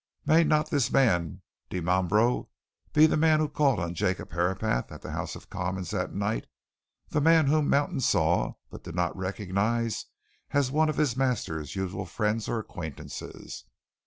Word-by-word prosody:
May 165 +2 +5
not 155 -1 +2
this 140 -6 +1
man 90 - +2 0.3
Dimambro 95 +6 +1 0.4
be 155 +1 +6
the 160 - +3
man 155 0 +4
who 155 - +2
called 140 -3 +2
on 85 0 -2
Jacob 85 - -2
Herapath 85 -7 0
at - - -10
the - - -6
House - - -4
of - - -13
Commons 90 -2 -3
that - - -2
night 100 +2 -2 0.6
the 150 - 0
man 160 0 +5
whom 150 +1 +2
Mountain 145 +2 +1
saw, 85 - +2 0.2
but - - -10
did 85 -1 -8
not 90 -1 0
recognize 105 +4 -1 0.5
as 140 -2 +2
one 155 +2 +3
of 155 - -2
his 145 -6 +2
master's 100 - -1
usual 95 -1 -3
friends 110 0 -1
or - - 0
acquaintances? 90 -9 -7
110 Hz, 160 wpm, -28 LUFS, 90-145 Hz, 0.6 s, be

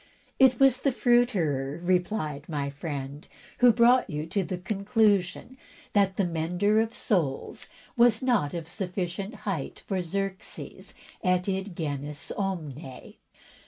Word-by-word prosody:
"It 260 -3 +6
was 270 -2 +5
the 275 - +2
fruiterer," 190 - +1
replied 175 -5 -1
my 140 -3 -2
friend, 145 -1 -6 0.3
"who 245 -1 +7
brought 240 +1 +4
you 150 -1 -3
to 190 +4 -1
the 185 +1 -4
conclusion 205 +4 0 0.3
that 195 -2 +2
the 195 - +2
mender 180 +6 +1
of 225 0 -3
soles 160 -10 -1 0.3
was 235 -1 +4
not 215 - +1
of 165 -2 -5
sufficient 185 +3 -4
height 185 -9 -3
for 190 -2 -1
Xerxes 195 +2 -5 0.3
et 180 0 +2
id 190 -1 -2
genus 145 -2 -4
omne.' 155 -9 -5
185 Hz, 125 wpm, -27 LUFS, 155-215 Hz, 0.3 s, who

